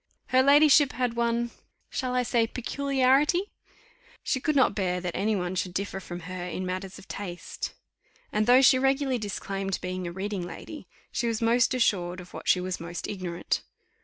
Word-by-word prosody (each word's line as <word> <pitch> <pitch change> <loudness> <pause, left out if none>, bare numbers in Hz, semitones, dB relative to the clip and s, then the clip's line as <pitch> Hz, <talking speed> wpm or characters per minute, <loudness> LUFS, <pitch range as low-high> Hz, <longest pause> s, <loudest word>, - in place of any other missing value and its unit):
Her 255 0 +5
ladyship 290 +1 +6
had 250 -2 0
one 235 0 0 0.4
shall 255 -1 -2
I 250 - +2
say? 235 -1 +2
peculiarity. 275 - +1 0.7
She 260 - 0
could 305 +3 0
not 260 -6 +4
bear 180 -3 -1
that 175 -1 -4
any 210 +3 +1
one 180 -1 -2
should 180 -1 -3
differ 200 0 -2
from 175 -2 -7
her 180 +1 -6
in 180 +1 -4
matters 185 +1 -4
of - - -14
taste; 180 -3 -6 0.6
and 215 +1 +1
though 255 +2 +7
she 260 0 +6
regularly 270 -1 +1
disclaimed 195 -2 -3
being 185 0 -4
a - - -4
reading 195 +2 -3
lady, 180 - -8 0.2
she 240 - -1
was 225 -1 0
most 235 +3 +3
assured 185 -7 +1
of 180 0 -12
what - - -8
she 180 - +5
was 180 0 -3
most 170 +1 -5
ignorant. 180 -4 -2
210 Hz, 180 wpm, -27 LUFS, 185-255 Hz, 0.7 s, though